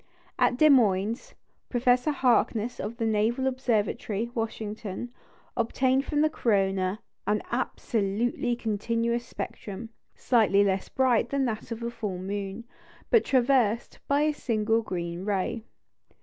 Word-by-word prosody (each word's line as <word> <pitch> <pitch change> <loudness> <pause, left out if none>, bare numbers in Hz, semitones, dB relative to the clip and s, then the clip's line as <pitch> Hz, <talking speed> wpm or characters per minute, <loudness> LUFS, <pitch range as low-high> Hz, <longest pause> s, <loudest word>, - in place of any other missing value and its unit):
At 245 - +3
Des 310 +2 +6
Moines, 220 -2 +2 0.3
Professor 245 +3 +2
Harkness 245 -4 +1
of 225 +3 -4
the 230 - -1
Naval 225 +4 +1
Observatory, 235 -3 -1
Washington, 220 -1 -4 0.4
obtained 260 +3 +1
from 295 -1 0
the 310 - +5
corona 195 -5 +1 0.3
an 210 0 +1
"absolutely 235 0 -1
continuous 230 +2 -1
spectrum," 210 0 -6 0.3
slightly 210 -5 +3
less 190 -1 0
bright 255 -4 +2
than 275 -1 +1
that 225 -1 -4
of 230 0 -4
the 235 0 -3
full 215 -6 -4
moon, 195 +3 -4 0.5
but 460 -3 +6
traversed 245 -4 +2
by 285 +1 +3
a 305 0 +2
single 225 -4 0
green 175 -3 -4
ray. 205 +3 -1
230 Hz, 125 wpm, -27 LUFS, 205-245 Hz, 0.5 s, Des